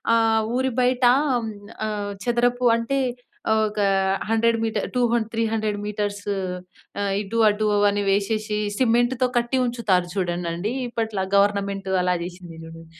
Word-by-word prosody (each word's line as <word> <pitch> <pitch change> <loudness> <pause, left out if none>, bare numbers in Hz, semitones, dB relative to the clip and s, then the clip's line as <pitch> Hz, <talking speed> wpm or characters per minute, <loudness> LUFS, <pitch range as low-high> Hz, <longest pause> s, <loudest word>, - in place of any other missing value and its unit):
ఆహ్, 225 -1 +3 0.2
ఊరి 260 0 0
బయట 250 0 +1 0.3
హ్మ్, 235 -3 -1 0.4
ఆహ్, 205 -1 -3
చదరపు 245 +1 +2
అంటే 230 +4 -1 0.7
ఒక 210 0 -5 0.5
100 230 +1 +2
మీటర్, 220 - -1
టూ 250 - +3
హం 240 - +3
త్రీ 230 0 0
హండ్రెడ్ 215 -2 -1
మీటర్స్ 205 -1 -3 0.8
ఆహ్, 200 -1 0
ఇటు 215 +3 -3
అటు 210 +1 0 0.2
అని 205 0 -1
వేసేసి 210 +1 0 0.2
సిమెంట్‍తో 245 +1 +2
కట్టి 240 +2 -1
ఉంచుతారు 200 -7 0
చూడండిండి. 175 +3 -2 0.2
ఇప్పట్ల 220 -5 -2
గవర్నమెంట్ 200 -1 +1
అలా 180 0 +2
జేసింది 175 -2 -9
చూడం 165 0 -11
215 Hz, 135 wpm, -23 LUFS, 200-235 Hz, 0.8 s, ఆహ్